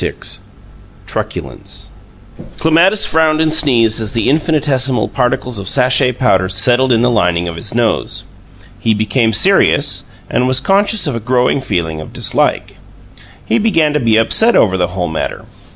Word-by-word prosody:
VI - - -2 0.9
TRUCULENCE - - -6 0.7
Clematis 170 +6 +3
frowned 160 -1 +2
and 160 -1 +1
sneezed 115 -7 +2
as 110 -2 -4
the 115 +2 0
infinitesimal 140 -5 0
particles 125 -2 -2
of 100 - -3
sachet 125 -1 +2
powder 95 -7 +1
settled 125 +7 +1
in 115 0 +2
the 125 - +2
lining 90 -5 0
of 85 - -5
his 100 +7 -7
nose. 120 -2 -1 0.6
He 110 -1 0
became 110 +2 0
serious, 110 0 +2 0.2
and 125 +1 0
was 130 0 +2
conscious 200 +8 +1
of 145 - -1
a - - -3
growing 125 +4 0
feeling 80 -9 -3
of 80 - -12
dislike; - - -1 0.7
he 110 - 0
began 165 -9 +1
to 150 - +1
be 115 -4 +2
upset 220 - +3
over 95 -3 +3
the 90 -1 0
whole 90 0 -4
matter. 80 0 -5
125 Hz, 155 wpm, -14 LUFS, 105-145 Hz, 0.9 s, Clematis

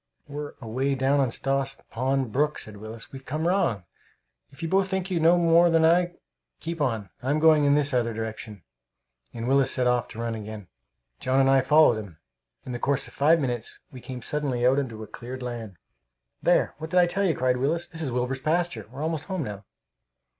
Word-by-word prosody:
"We're 145 0 -6
away 130 +4 -1
down 135 +2 +2
on 135 -2 +2
Stoss 135 +2 -1 0.2
Pond 130 0 0
brook," 150 +5 +1
said 110 -1 -8
Willis. 110 +2 -10
"We've 135 -1 -9
come 155 +5 -2
wrong! 175 - +1 0.7
If 140 +4 -12
you - - 0
both 190 +3 +2
think 190 0 -2
you 175 - +1
know 165 +2 +5
more 170 0 +5
than 165 -1 +4
I, 175 +1 +3 0.5
keep 165 -1 -5
on; 110 -9 -1
I'm 135 +4 0
going 155 -1 +5
in 140 0 +4
this 145 -1 +2
other 120 -2 +1
direction," 110 -3 -6 0.7
and 115 +1 -5
Willis 135 0 +3
set 125 - +1
off 125 -1 +2
to 115 - -10
run 115 0 -2
again. 110 -3 -8 0.5
John 130 +1 +1
and 135 0 +4
I 135 -1 +5
followed 140 -4 +5
him. 100 -7 -10 0.5
In 125 - -6
the 120 - -4
course 140 +1 0
of - - -15
five 160 +4 +4
minutes 120 -5 -3
we 130 - -10
came 125 -2 -7
suddenly 135 -4 -1
out 130 +2 +4
into 115 -5 -5
cleared 125 +4 -8
land. 115 -6 -6 0.6
"There! - - +3
What 160 +1 -6
did 180 - +3
I 175 - +6
tell 195 +3 -1
you?" 175 -6 +2
cried 125 0 +1
Willis. 155 +7 0
"This 165 - -9
is 150 - -2
Wilbur's 125 +2 -2
pasture. 155 - -1
We're 135 +4 -6
almost 160 -1 -2
home 190 -4 -3
now." 105 -4 -7
135 Hz, 205 wpm, -26 LUFS, 120-160 Hz, 0.7 s, I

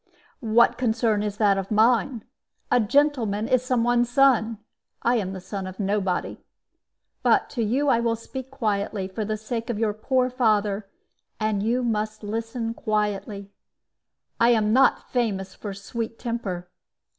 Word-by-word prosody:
"What 235 +1 +3
concern 225 -3 +1
is 210 -1 -3
that 200 -3 +3
of 195 - -5
mine? 225 +2 +2 0.5
A 245 - +5
gentleman 230 -4 +1
is 255 -2 +3
some 255 -2 +1
one's 240 0 +2
son. 240 -4 +3 0.5
I 240 +1 +3
am 190 -3 -2
the 190 - -6
son 190 +1 -6
of 185 +2 -9
nobody. 195 -2 -1 0.8
But - - +2
to 235 - -1
you 260 +7 +1
I 235 - +4
will 230 -1 +1
speak 260 +3 -8
quietly, 205 -6 -2
for 195 +3 -4
the 215 +1 -2
sake 230 +2 -5
of 235 - -1
your 215 -1 0
poor 255 +4 0
father. 210 -4 +1 0.5
And 215 -2 0
you 240 +4 0
must 215 -2 -2
listen 225 +2 -3
quietly. 210 -2 -2 0.9
I 235 - +5
am 215 -2 +3
not 265 +2 +3
famous 195 -6 -1
for 205 - -7
sweet 225 +4 -5
temper. 205 -7 -4
220 Hz, 155 wpm, -24 LUFS, 205-240 Hz, 0.9 s, A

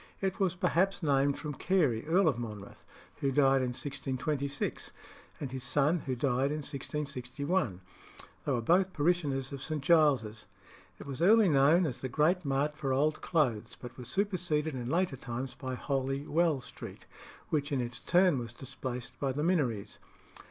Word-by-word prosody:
It 190 +1 -2
was 190 -3 +1
perhaps 185 +2 +1
named 140 -1 +2
from 150 -2 -5
Carey, 140 -8 +1
Earl 180 +3 +4
of 135 -6 +1
Monmouth, 105 -4 -8 0.3
who 140 - 0
died 135 -1 +4
in 130 - 0
1626, 135 +2 -3 0.5
and 135 -4 -5
his 130 -1 -4
son, 145 +6 +2
who 130 - 0
died 130 +1 +1
in 150 0 -3
1661: 140 - -2 0.6
they 145 - -1
were 120 -3 +1
both 180 +9 +3
parishioners 145 -4 0
of 140 -1 -6
St. 155 -1 -3
Giles's. 135 -10 +3 0.5
It - - -9
was 140 +1 -6
early 215 +4 +6
known 150 +5 +5
as 130 -6 -3
the 130 - -3
great 160 +7 +2
mart 140 +1 0
for 140 -3 -2
old 150 +4 +1
clothes, 130 -11 0
but 125 -1 -9
was 125 -2 -9
superseded 175 -4 0
in 125 -2 -4
later 170 -3 +1
times 125 +1 -5
by 130 -2 -5
Holy 135 +1 -2
Well 160 -4 +2
Street, - - -10 0.4
which 150 -1 -1
in 140 - +1
its 120 0 -3
turn 180 -5 +3
was 115 -1 -6
displaced 130 -1 -7
by 135 -1 0
the 145 +3 -2
Minories. 125 - 0
140 Hz, 165 wpm, -31 LUFS, 130-160 Hz, 0.6 s, early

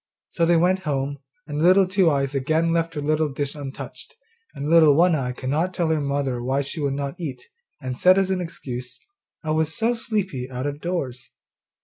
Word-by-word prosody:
So 165 -1 +1
they 170 0 +5
went 180 +3 +3
home, 140 -4 -2 0.3
and 150 0 -3
Little 185 +3 +6
Two 185 -2 +3
eyes 140 -2 0
again 160 +5 +1
left 165 -1 0
her 150 - -2
little 155 +1 +1
dish 140 0 -3
untouched, 140 -3 -8 0.4
and 140 - -4
Little 160 -3 +6
One 175 +3 +5
eye 130 -5 0
could 130 +1 -4
not 170 +5 0
tell 170 -2 0
her 160 -2 +1
mother 140 -3 -1
why 135 +3 0
she 145 +3 -5
would 140 -1 0
not 140 +2 -4
eat, 130 -7 -5 0.4
and 130 -1 -4
said 185 +8 +5
as 190 -1 +2
an 185 -1 0
excuse, 125 -7 -6 0.4
'I 155 - -2
was 160 0 0
so 230 +2 +2
sleepy 195 - -3
out 130 +1 -4
of 145 +1 -4
doors. 135 -8 -3
150 Hz, 205 wpm, -23 LUFS, 135-170 Hz, 0.4 s, Little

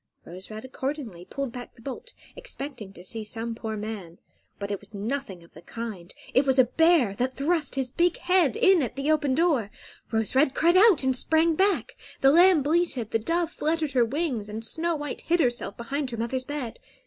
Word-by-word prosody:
Rose 185 +3 -10
Red 215 +2 -8
accordingly 260 - -5
pulled 275 +6 -4
back 245 0 -9
the - - -18
bolt, 275 - -8 0.2
expecting 280 - -7
to 175 - -13
see 220 +4 -4
some 225 +2 -4
poor 220 -1 -5
man. 205 -5 -6 0.4
But 200 0 -5
it 200 - -2
was 205 +1 -12
nothing 205 -4 -4
of 170 - -21
the - - -13
kind; 205 -3 -7 0.2
it 260 - +5
was 265 -1 +2
a 260 - +8
bear, 320 - +3
that 255 +1 -1
thrust 305 +2 0
his 265 -2 -2
big 345 +4 +1
head 355 - +2
in 380 -3 +5
at 245 -2 -3
the 275 +3 0
open 295 -4 +1
door. 295 - +2 0.4
Rose 220 -1 -1
Red 270 0 +3
cried 340 +2 +3
out 390 -5 +6
and 260 -1 +2
sprang 320 +5 +3
back, 385 +4 +1 0.3
the 270 - +6
lamb 345 -1 +6
bleated, 295 -7 0
the 225 - +1
dove 335 +8 -1
fluttered 315 -2 -1
her 250 -3 +3
wings 245 -4 -2
and 220 +2 -1
Snow 335 +4 +1
White 295 -1 -5
hid 345 +1 +1
herself 240 -8 0
behind 275 +4 -3
her 235 - -6
mother's 255 +3 -2
bed. 285 -5 -5
265 Hz, 205 wpm, -26 LUFS, 225-320 Hz, 0.4 s, a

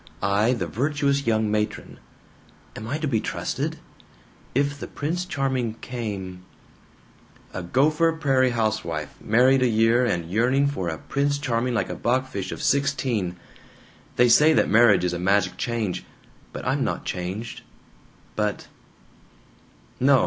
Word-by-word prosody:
I, 105 +5 +3
the 100 -8 -2
virtuous 140 - 0
young 110 -2 +2
matron. 105 0 -3 0.8
Am 110 - -7
I 135 +6 -2
to 155 0 -2
be 115 -6 +1
trusted? - - -3 0.8
If 140 +1 0
the - - -6
Prince 170 +5 -3
Charming 130 -8 -1
came 100 -7 -6 1.1
"A 95 - -4
Gopher 150 - +2
Prairie 135 -5 +2
housewife, 110 -10 -2
married 130 +4 +4
a 130 - +4
year, 115 +2 +3
and 90 -9 0
yearning 125 +7 +2
for 120 -12 -2
a 80 - -4
'Prince 140 - -1
Charming' 125 -3 -1
like 105 - -1
a - - -4
bachfisch 125 -5 -1
of - - -6
sixteen! 130 -10 0 0.8
They 125 - +5
say 150 +7 +6
that - - +2
marriage 110 -4 +5
is 90 -1 0
a 85 - -3
magic 95 0 +2
change. 115 -6 -2 0.5
But - - -7
I'm - - +1
not - - -3
changed. 95 +6 -4 0.7
But 105 -1 -1 1.3
"No! 135 +1 +5
120 Hz, 140 wpm, -24 LUFS, 105-135 Hz, 1.3 s, say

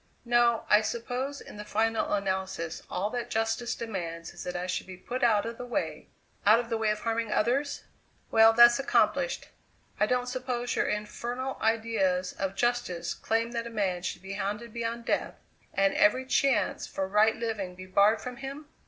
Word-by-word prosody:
"No. 240 -1 +3
I 210 - +6
suppose 250 +5 -3
in - - -11
the 210 - -6
final 225 +2 0
analysis 190 -4 -2
all 200 +4 -2
that 245 -1 -3
justice 225 +2 -1
demands 170 -7 -5
is 175 - -8
that 180 - -4
I 175 0 -2
should 185 0 -3
be 185 -1 -9
put 250 +7 -5
out 220 -3 +4
of 230 0 -6
the - - -4
way 245 - -3 0.3
out 215 +3 +6
of 240 -1 -4
the 225 - +1
way 220 -1 +1
of 210 0 -1
harming 230 -1 -1
others? 265 +8 0 0.5
Well, 225 0 +7
that's 240 +2 +7
accomplished. - - +1 0.5
I 210 - +3
don't 250 +1 +1
suppose 250 -1 -3
your - - +1
infernal 240 +5 -3
ideas 220 -5 +1
of 195 0 -3
justice 220 -8 -1
claim 230 +1 -1
that 235 -1 -3
a - - -6
man 195 -5 -1
should 180 - -5
be 190 +1 -6
hounded 210 +3 -4
beyond 235 0 -3
death, - - -1 0.4
and 195 0 +2
every 255 +5 +3
chance 275 0 +1
for 190 -1 -3
right 210 +3 +4
living 215 -6 -3
be 185 +1 -9
barred 200 +4 +3
from 250 -1 -6
him? 275 +3 -7
225 Hz, 185 wpm, -29 LUFS, 195-240 Hz, 0.5 s, Well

